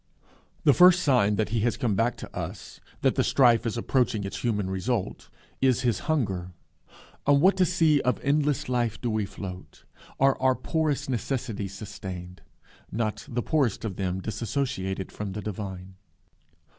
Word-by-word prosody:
The 145 - +6
first 180 +2 +6
sign 120 -8 +3
that 110 0 0
he 115 +1 0
has 115 +2 0
come 115 -4 0
back 115 +5 +1
to - - -10
us, - - -6 0.2
that - - +4
the - - +1
strife 120 -3 +4
is 115 - -2
approaching 115 -3 +1
its 100 0 -5
human 105 -5 0
result, 95 +3 -2 0.3
is 130 -2 +3
his 120 -5 +1
hunger. 95 - -1 0.7
On 140 0 +6
what 190 +4 +4
a 180 - +5
sea 160 -5 +3
of 125 - 0
endless 145 -1 +1
life 120 -3 0
do 120 - -2
we 110 -2 -1
float, 95 -1 -9 0.4
are 135 -1 +3
our 130 -1 +4
poor 160 +5 -1
necessities 125 -7 -3
sustained 95 -3 -8 0.5
not 110 -2 -2
the 120 0 -2
poorest 135 -10 0
of 100 -5 -4
them 95 -1 -2
dissociated 105 -3 -3
from 100 -2 -5
the 105 - -4
divine! 95 -2 -6
115 Hz, 160 wpm, -27 LUFS, 100-135 Hz, 0.7 s, The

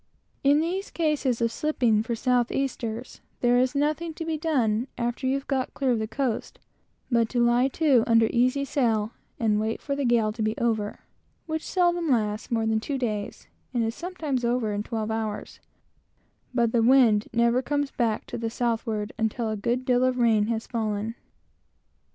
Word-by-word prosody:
In 285 +2 +5
those 370 +4 -2
cases 295 -7 0
of 230 -1 +2
slipping 240 -6 +1
for 235 +1 -2
south 245 +1 +1
easters, 245 -3 -3 0.2
there 245 0 +4
is 255 +2 +1
nothing 305 +3 0
to 325 - -5
be 325 -1 -1
done, 255 -8 0
after 240 +2 -2
you 265 - +2
have 275 - -4
got 265 -2 -1
clear 270 -2 +1
of 235 - +1
the 220 - -2
coast, 235 0 -2 0.5
but 230 -2 +3
to 245 - -1
lie 240 +2 +4
to 275 -4 +3
under 230 -1 +5
easy 255 +3 +2
sail, 225 -6 0 0.3
and 215 -2 +2
wait 220 +1 -1
for 280 - -3
the 280 - -2
gale 235 -3 +2
to 220 +1 -6
be 215 +1 0
over, 220 -3 -1 0.4
which 315 -1 -2
seldom 350 -3 +1
lasts 215 -4 0
more 225 -2 0
than 220 0 +1
two 275 +5 -3
days, 215 -5 -4 0.3
and 235 - +2
is 225 +8 -4
often 310 -8 -2
over 235 -3 0
in 205 - -1
twelve 220 0 -3
hours; 220 -1 -4 0.9
but 235 -3 +1
the 235 - +2
wind 230 -4 +5
never 235 +2 +3
comes 285 +1 -1
back 230 -4 -1
to - - -6
the 225 0 -2
southward 225 -2 -2
until 225 +2 0
there 220 - -1
has 215 - -3
been 235 - 0
a - - +2
good 255 +1 -7
deal 250 0 +3
of 255 0 +2
rain 225 -3 +3
fallen. 220 -2 -3
240 Hz, 190 wpm, -26 LUFS, 220-275 Hz, 0.9 s, In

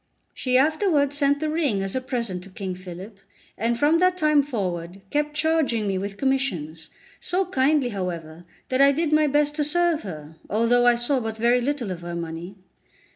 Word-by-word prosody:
She 255 -1 +1
afterwards 300 0 +2
sent 285 0 +2
the 310 0 -1
ring 285 -12 0
as 195 - -3
a 260 - 0
present 235 -8 -3
to - - -12
King 190 -1 -5
Philip, 185 +3 -10 0.4
and 230 +2 0
from 300 +6 +3
that 365 0 +3
time 305 -3 +4
forward 190 -8 -4
kept 295 0 -1
charging 300 -8 +1
me 190 -1 0
with 200 +1 -5
commissions, 185 - -2 0.3
so 375 +2 -1
kindly, 280 -5 +2
however, 175 -5 -5 0.3
that 255 +1 +2
I 280 0 +7
did 315 +1 -1
my 305 0 +4
best 295 +1 +1
to 300 - +2
serve 340 +1 +1
her, 160 -4 -9
although 230 +4 +3
I 240 - +6
saw 240 +3 0
but 225 -2 -4
very 240 +2 +3
little 255 -5 -2
of 175 -2 -6
her 175 0 -6
money. 170 +3 -6
245 Hz, 185 wpm, -24 LUFS, 190-295 Hz, 0.4 s, I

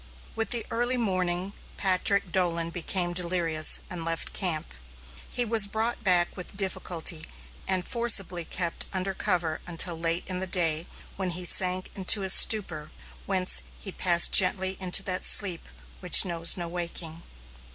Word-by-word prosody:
With 225 -2 -4
the 235 -2 0
early 245 +2 -1
morning, 185 -3 -3 0.2
Patrick 195 0 0
Dolan 170 -2 -2
became 175 0 -1
delirious 170 -3 +2
and 175 -2 -8
left 165 0 -6
camp. 165 - -2 0.6
He 245 - -2
was 220 -3 +4
brought 220 +3 -4
back 180 -3 +1
with 185 +1 -10
difficulty 180 -4 -2 0.5
and 185 -2 -1
forcibly 200 -7 +1
kept 170 0 -5
under 190 +1 -3
cover 175 -6 -3
until 170 0 -3
late 165 +1 -3
in 185 -1 -5
the 190 - -5
day, 165 -3 -1 0.3
when 190 -1 -4
he 180 +1 -6
sank 185 +1 +3
into 195 +1 +4
a 190 - -3
stupor, 175 -7 +4 0.4
whence 185 -2 +2 0.2
he 195 - -9
passed 170 -2 +2
quietly 190 0 +4
into 185 +1 +3
that 185 -1 -5
sleep 185 -5 0 0.3
which 180 +2 +7
knows 170 -1 -1
no 175 -1 -6
waking. 170 -1 -8
180 Hz, 150 wpm, -25 LUFS, 170-195 Hz, 0.6 s, which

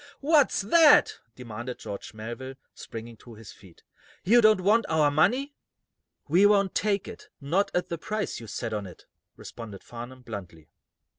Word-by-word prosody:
"What's 290 -4 +3
that?" 305 +8 +5 0.2
demanded 120 0 -7
George 100 +2 -8
Melville, 120 +5 -7 0.2
springing 115 0 -9
to 115 0 -14
his 110 -2 -12
feet. 95 -5 -19 0.4
"You 235 +6 +5
don't 215 -3 +5
want 215 +4 +3
our 155 -2 +3
money?" 245 - +1 0.7
"We 180 +7 +5
won't 200 -2 +2
take 205 -2 0
it - - -11
not 170 +8 0
at 180 - -1
the 170 - -4
price 215 +4 -4
you 115 - -10
set 110 +1 -5
on 105 -2 -4
it," 90 - -15 0.3
responded 105 -4 -10
Farnum, 120 +2 -10
bluntly. 90 -9 -9
140 Hz, 155 wpm, -26 LUFS, -, 0.7 s, that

